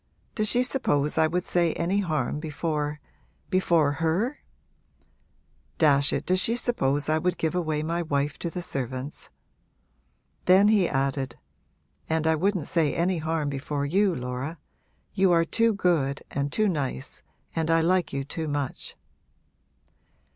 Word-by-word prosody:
Does 215 -1 0
she 245 +4 +3
suppose 150 - 0
I 160 - +5
would 175 +2 -1
say 170 -3 +1
any 185 +4 0
harm 155 -7 -1
before 150 -1 -2 0.5
before 170 -6 +3
her? 165 - 0 1.4
Dash 140 -3 +4
it, - - -2
does 185 0 +2
she 230 +4 +1
suppose 145 - 0
I 155 +1 +2
would 180 +1 0
give 160 0 -1
away 155 -4 -1
my 170 +2 -1
wife 145 -2 -1
to 170 - -3
the 175 +2 -5
servants?' 130 -3 -4 1.2
Then 190 +3 +6
he 205 -5 +3
added, 135 -2 -1 0.7
'And 160 0 0
I 160 - +4
wouldn't 180 0 0
say 160 -4 +1
any 175 +1 +1
harm 160 -1 -1
before 140 +1 -2
you, 190 +4 +2
Laura. 125 +6 -4 0.6
You 190 -2 +3
are 165 0 +4
too 230 +6 +2
good 165 -9 0
and 140 0 -2
too 215 +5 +2
nice 140 - -3 0.3
and 160 -1 0
I 165 0 +4
like 180 +1 +2
you 140 0 -2
too 160 +3 -4
much!' 145 -2 -3
160 Hz, 145 wpm, -26 LUFS, 145-180 Hz, 1.4 s, Then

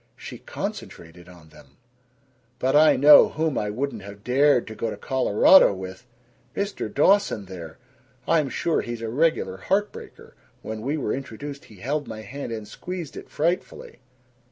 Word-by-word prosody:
She - - -10
concentrated 85 +1 -8
on 85 -3 -16
them: - - -19 0.8
"But 130 +3 0
I 155 +1 +6
know 145 +3 +8
whom 155 -2 -2
I 105 - -1
wouldn't 125 +1 -4
have 100 +1 -12
dared 135 +1 +3
to 110 - -8
go 115 - -3
to - - -6
Colorado 130 - +4
with! 95 +4 -9 0.5
Mr. 200 - -3
Dawson 170 - +2
there! 85 -4 -10 0.5
I'm 155 -4 +2
sure 165 +5 0
he's 120 -1 -6
a 115 - -3
regular 130 - 0
heart 200 - 0
breaker. - - -13 0.3
When 110 0 -6
we 140 +7 -2
were 130 -7 -2
introduced 140 +2 -7
he 110 - -16
held 140 +9 -3
my 110 - -7
hand 120 +4 -7
and 110 -2 -6
squeezed 175 - -7
it - - -10
frightfully." 170 -4 -3
125 Hz, 160 wpm, -24 LUFS, 105-150 Hz, 0.8 s, know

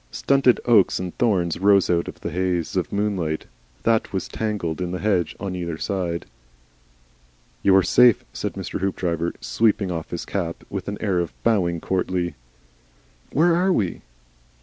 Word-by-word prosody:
Stunted 135 - +3
oaks 110 -6 +4
and 90 -1 -5
thorns 90 -9 +1
rose 100 0 +4
out 85 -1 +1
of - - -9
the 85 - -4
haze 90 -1 -1
of - - -1
moonlight 95 -7 -1 0.4
that 115 -1 +2
was 95 - -3
tangled 95 -7 -3
in 90 - -2
the 90 - -3
hedge 95 -5 0
on 95 -2 -4
either 85 -3 -4
side. 90 -3 -2 1.4
"You 95 - +5
are 95 - +6
safe," 120 +5 +5
said - - -3
Mr. - - -5
Hoopdriver, 85 -3 -1
sweeping 105 -4 +1
off 80 -2 -4
his 85 - -5
cap 85 -4 -3
with 100 -2 -4
an 100 0 -3
air 95 -5 +1
and 85 -2 -1
bowing 90 -7 +1
courtly. 90 -1 -1 1.0
"Where 165 +4 +4
are 185 +2 +2
we?" 100 - 0
95 Hz, 160 wpm, -23 LUFS, 85-105 Hz, 1.4 s, are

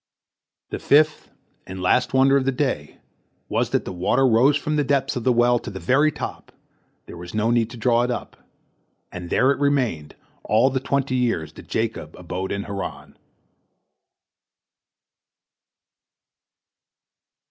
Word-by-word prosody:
The - - -4
fifth 155 +2 +2 0.4
and 95 0 -7
last 125 +7 +2
wonder 135 +1 +4
of 135 -2 +2
the 135 - +2
day 125 - -3 0.5
was - - 0
that - - -1
the - - -5
water 90 +9 +1
rose 130 +5 +4
from 150 0 -2
the 150 - +2
depths 140 0 0
of 125 - -3
the 130 - +3
well 120 0 +3
to - - -8
the 95 -3 -7
very 135 - +3
top, - - -7 0.5
there - - -11
was 85 +3 -9
no 110 +2 +1
need 115 -2 +1
to 120 - -10
draw 120 +1 +2
it 120 - 0
up, 120 - -5 0.8
and 90 -1 -7
there 130 +2 +3
it 140 - -2
remained 125 - 0 0.3
all 115 +5 +3
the 130 - 0
twenty 135 0 -1
years 85 -11 -1
that - - -13
Jacob 110 -9 -3
abode 90 +2 -5
in 100 0 -2
Haran. 100 -1 -7
120 Hz, 150 wpm, -22 LUFS, 100-135 Hz, 0.8 s, wonder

